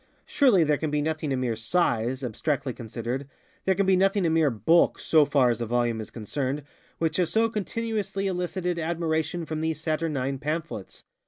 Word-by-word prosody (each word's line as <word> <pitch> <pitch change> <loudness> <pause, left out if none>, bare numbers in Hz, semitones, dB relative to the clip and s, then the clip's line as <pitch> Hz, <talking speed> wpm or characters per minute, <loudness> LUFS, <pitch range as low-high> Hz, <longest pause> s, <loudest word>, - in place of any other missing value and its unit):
Surely 245 - +4
there 150 -1 +1
can 155 - -1
be 150 0 0
nothing 155 -1 -2
in 130 - 0
mere 125 -2 0
_size, 120 0 0
_abstractly 135 +3 -2
consideredŌĆöthere 125 - -4
can 200 - +2
be 190 0 +4
nothing 195 0 +2
in 160 - +2
mere 160 -3 +4
_bulk, 135 - +3
so 155 -3 +4
_far 135 -4 +4
as 120 0 -3
a 115 - -2
volume 120 -1 0
is 110 - -8
concerned, 130 +6 -3 0.3
which 160 -2 0
has 180 -3 +2
so 225 +1 +3
continuously 210 -2 -3
elicited 180 -1 -2
admiration 165 0 -1
from 155 0 -4
these 160 -1 -1
saturnine 155 -4 -1
pamphlets! 150 - -4
155 Hz, 175 wpm, -26 LUFS, 130-175 Hz, 0.3 s, Surely